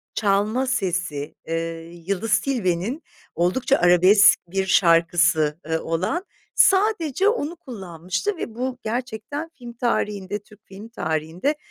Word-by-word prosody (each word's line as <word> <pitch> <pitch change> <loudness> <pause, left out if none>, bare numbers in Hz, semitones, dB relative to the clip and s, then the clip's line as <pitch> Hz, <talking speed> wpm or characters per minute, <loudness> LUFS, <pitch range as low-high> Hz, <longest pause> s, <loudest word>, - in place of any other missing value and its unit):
çalma 215 +5 +1
sesi, 175 - -2
eee, 165 0 -4 0.2
Yıldız 200 +2 +1
Tilbe'nin 230 - -1 0.3
oldukça 185 +11 +2
arabesk 180 +4 +6
bir 190 +2 -1
şarkısı, 170 -3 +3
ııı, 160 0 0
olan. 185 - -1 0.3
Sadece 390 - +3
onu 345 -8 -2
kullanmıştı 195 - -4
ve 225 - -6
bu 255 +1 -3
gerçekten 250 +6 -4
film 240 -2 -10
tarihinde, 210 -4 -2
Türk 210 0 -20
film 200 +4 -11
tarihinde, 160 - -2
200 Hz, 115 wpm, -23 LUFS, 175-255 Hz, 0.3 s, arabesk